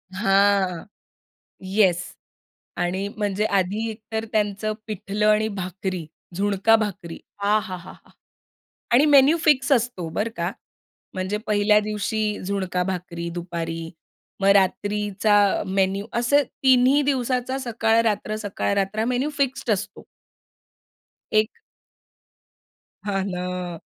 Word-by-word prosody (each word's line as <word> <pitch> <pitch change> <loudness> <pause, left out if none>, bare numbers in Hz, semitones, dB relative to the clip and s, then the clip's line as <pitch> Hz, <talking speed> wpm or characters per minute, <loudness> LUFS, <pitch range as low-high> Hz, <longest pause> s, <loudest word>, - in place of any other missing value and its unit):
हां. 195 -2 +2 0.8
येस 190 -2 +3 0.8
आणि 185 +3 -1
म्हणजे 205 0 0
आधी 200 +2 0
एकतर 220 0 -5
त्यांचं 210 0 0
पिठलं 210 0 -2
आणि 215 +1 +3
भाकरी, 185 -3 -4 0.3
झुणका 200 +3 +3
भाकरी 200 -6 -3 0.2
आहाहाहा! 195 -4 -1 1.0
आणि 250 +5 +6
मेनू 290 +2 +6
फिक्स 285 -2 +3
असतो 235 -9 +1
बरं 210 +7 -2
का. 170 +2 -1 0.6
म्हणजे 190 +2 -2
पहिल्या 210 0 +4
दिवशी 210 +1 -2 0.2
झुणका 185 -2 -1
भाकरी 175 -2 -4
दुपारी, 165 -1 -4 0.5
मग 195 - +3
रात्रीचा 205 +1 +1 0.3
मेनू 195 +1 0
असे 285 +5 +3
तिन्ही 260 +2 +3
दिवसाचा 260 -2 0
सकाळ-रात्र, 225 -3 +1
सकाळ-रात्र 200 -1 -1
हा 220 - +1
मेनू 250 +4 0
फिक्स्ड 270 -3 0
असतो. 195 - -5 1.3
एक 215 0 +3 1.6
हां 195 -2 -1
ना. 180 -1 -4
205 Hz, 100 wpm, -23 LUFS, 190-225 Hz, 1.6 s, आणि